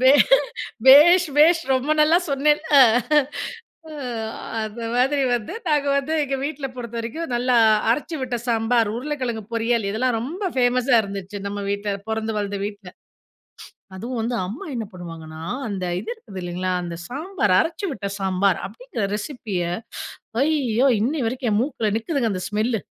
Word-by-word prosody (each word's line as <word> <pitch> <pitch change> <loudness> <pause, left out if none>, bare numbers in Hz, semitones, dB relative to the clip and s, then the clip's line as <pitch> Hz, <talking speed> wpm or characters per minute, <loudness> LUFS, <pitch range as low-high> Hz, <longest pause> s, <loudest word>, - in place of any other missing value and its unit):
பே 260 +1 +6 0.8
பேஷ் 345 +7 +8
பேஷ் 330 +2 +6
ரொம்ப 260 +4 -1
நல்லா 315 +3 +5
சொன்னேல்! 295 +2 +3 0.2
அ, - - +9 1.1
அ - - -9 0.7
அந்த 215 +2 -6
மாதிரி 270 +3 +2
வந்து 230 -3 -5
நாங்க 295 -2 +2
வந்து 280 +3 -1
எங்க 275 -1 -2
வீட்ல 290 -2 -4
பொறுத்த 235 -2 -7
வரைக்கும், 315 +9 -4
நல்லா 245 0 +2 0.3
அரைச்சு 300 +5 -2
விட்ட 250 -1 -2
சாம்பார். 230 -1 +2
உருளைக்கிழங்கு 250 -5 -3
பொரியல். 230 -2 +1
இதெல்லாம் 235 +2 0
ரொம்ப 340 - -3
ஃபேமஸா 250 0 +3
இருந்துச்சு. 200 0 -6
நம்ம 205 0 -4
வீட்ல 200 0 -2
பொறந்து 220 0 -2
வளந்த 200 -1 -3
வீட்ல. 205 -3 -7 1.1
அதுவும் 235 +4 -4
வந்து 235 +2 -1
அம்மா 240 - -7
என்ன 230 -2 -3
பண்ணுவாங்கன்னா, 165 -3 -9 0.3
அந்த 190 -3 -3 0.2
இது - - -6
இருக்குது 200 - -10
இல்லைங்களா, 180 +1 -2
அந்த 170 -1 -5
சாம்பார் 295 - 0
அரைச்சு 335 +4 -2
விட்ட 205 -5 -5
சாம்பார் 190 -1 +1
அப்படிங்கிற 230 +2 -5
ரெசிபிய 210 -4 -4 0.8
ஐய்யோ! 275 -5 +2 0.2
இன்னை 290 +6 0
வரைக்கும் 245 0 -2
என் 205 - +2
மூக்குல 245 -6 -1
நிக்குதுங்க 235 -1 -1
அந்த 185 -1 -4
ஸ்மெல்லு! 220 +1 0
235 Hz, 145 wpm, -22 LUFS, 205-280 Hz, 1.1 s, அ